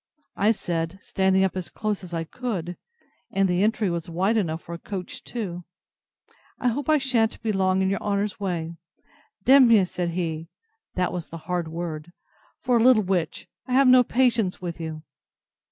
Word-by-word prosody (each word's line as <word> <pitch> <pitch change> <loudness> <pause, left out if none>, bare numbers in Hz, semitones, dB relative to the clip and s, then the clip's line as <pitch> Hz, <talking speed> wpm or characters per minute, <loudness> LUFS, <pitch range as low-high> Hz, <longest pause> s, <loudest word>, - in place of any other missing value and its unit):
I 210 +2 +3
said, 170 -4 -3
standing 190 0 +2
up 190 - 0
as 185 -2 -4
close 210 -2 -3
as 180 - -9
I 165 -1 -2
could, 180 -3 -4 0.6
(and 195 0 +2
the 180 0 +1
entry 215 0 +2
was 170 -2 -3
wide 190 +6 +1
enough 165 -6 -1
for 170 - -8
a 170 - -6
coach 185 -2 -6
too,) 180 -7 -5 0.9
I 250 - +1
hope 270 +4 -3
I 310 - +6
shan't 245 -5 +1
be 220 - +1
long 190 -1 +2
in 190 - +1
your 195 - -1
honour's 205 0 -1
way. 170 -4 -3 0.7
D—mn 265 -1 +7
you! 215 -5 +6
said 175 -1 -3
he, 165 -2 -3 0.5
(that 180 -1 0
was 175 -2 -4
the 165 - -7
hard 175 -2 -1
word,) 165 -1 -5 0.5
for 250 -2 +3
a 225 - +3
little 245 -4 +6
witch; 180 -3 -2 0.2
I 250 - -3
have 270 +1 +5
no 255 0 +8
patience 235 -6 +1
with 170 -2 -6
you. 155 -1 -6
190 Hz, 185 wpm, -25 LUFS, 170-225 Hz, 0.9 s, no